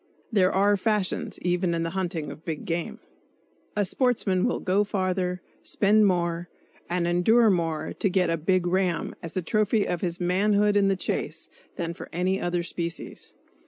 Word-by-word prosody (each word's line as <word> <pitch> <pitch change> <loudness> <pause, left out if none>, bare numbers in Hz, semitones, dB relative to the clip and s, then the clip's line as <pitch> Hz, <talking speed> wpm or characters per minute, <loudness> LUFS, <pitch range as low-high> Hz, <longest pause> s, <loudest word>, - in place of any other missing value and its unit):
(There 190 -4 +3
are 200 +2 +3
fashions, 210 -2 -1
even 175 0 +1
in 165 - -1
the 165 - -2
hunting 175 -5 -3
of 160 - -11
big 160 -3 -5
game!) 170 0 -3 0.8
A 205 -1 +2
sportsman 200 -5 +1
will - - -1
go 195 +2 +2
farther, 185 -2 -1 0.2
spend 210 +1 +3
more 175 -2 0 0.4
and 175 0 0
endure 210 +6 +4
more 165 -4 -1
to 200 - 0
get 180 -2 +2
"a - - +2
big 175 +3 +1
ram" 180 -1 0
as 165 +1 -6
a 185 - 0
trophy 215 +3 +1
of 175 - -2
his 175 -2 -2
manhood 205 +3 +2
in 200 -1 +4
the 195 - +2
chase - - -3 0.3
than 170 -1 -3
for - - -10
any 185 +2 0
other 175 0 -1
species. 170 0 -5
185 Hz, 170 wpm, -26 LUFS, 170-200 Hz, 0.8 s, endure